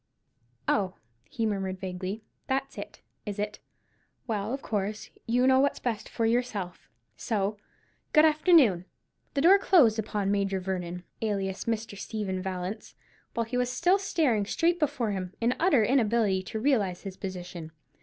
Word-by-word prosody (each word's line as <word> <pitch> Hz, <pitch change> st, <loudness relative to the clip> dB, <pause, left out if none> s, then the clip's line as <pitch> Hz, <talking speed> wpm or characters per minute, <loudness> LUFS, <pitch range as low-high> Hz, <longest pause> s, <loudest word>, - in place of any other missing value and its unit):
"Oh," 190 Hz, -3 st, +1 dB, 0.3 s
he 230 Hz, -, -2 dB
murmured, 195 Hz, -3 st, -2 dB
vaguely, 185 Hz, +3 st, -4 dB, 0.2 s
"that's 270 Hz, 0 st, -1 dB
it, -, -, -9 dB, 0.2 s
is 205 Hz, -1 st, -5 dB
it? 210 Hz, +1 st, -3 dB, 0.7 s
Well, 215 Hz, -1 st, -2 dB
of 270 Hz, +1 st, -4 dB
course, 210 Hz, 0 st, -3 dB, 0.2 s
you 245 Hz, +2 st, +3 dB
know 260 Hz, 0 st, +5 dB
what's 280 Hz, +1 st, +2 dB
best 230 Hz, -4 st, -3 dB
for 230 Hz, -, -1 dB
yourself—so, 215 Hz, -2 st, -2 dB, 0.5 s
good 305 Hz, 0 st, +7 dB
afternoon!" 305 Hz, -, +5 dB, 0.5 s
The 275 Hz, -, +2 dB
door 380 Hz, +6 st, +7 dB
closed 260 Hz, -, +5 dB
upon 205 Hz, -2 st, -1 dB
Major 195 Hz, -1 st, 0 dB
Vernon, 180 Hz, -1 st, -4 dB, 0.2 s
alias 195 Hz, -3 st, -2 dB
Mr. 225 Hz, -2 st, -2 dB
Stephen 200 Hz, -2 st, -3 dB
Vallance, 190 Hz, +3 st, -5 dB, 0.4 s
while 230 Hz, -, 0 dB
he 245 Hz, +3 st, -3 dB
was 250 Hz, 0 st, +1 dB
still 360 Hz, +9 st, +3 dB
staring 270 Hz, -, +1 dB
straight 345 Hz, +7 st, +1 dB
before 255 Hz, -7 st, 0 dB
him, 185 Hz, -2 st, -4 dB
in 235 Hz, +2 st, +2 dB
utter 320 Hz, -, +4 dB
inability 225 Hz, -5 st, +2 dB
to 220 Hz, -, -4 dB
realize 215 Hz, -8 st, +1 dB
his 195 Hz, -2 st, -6 dB
position. 180 Hz, -4 st, -7 dB
215 Hz, 145 wpm, -28 LUFS, 190-250 Hz, 0.7 s, good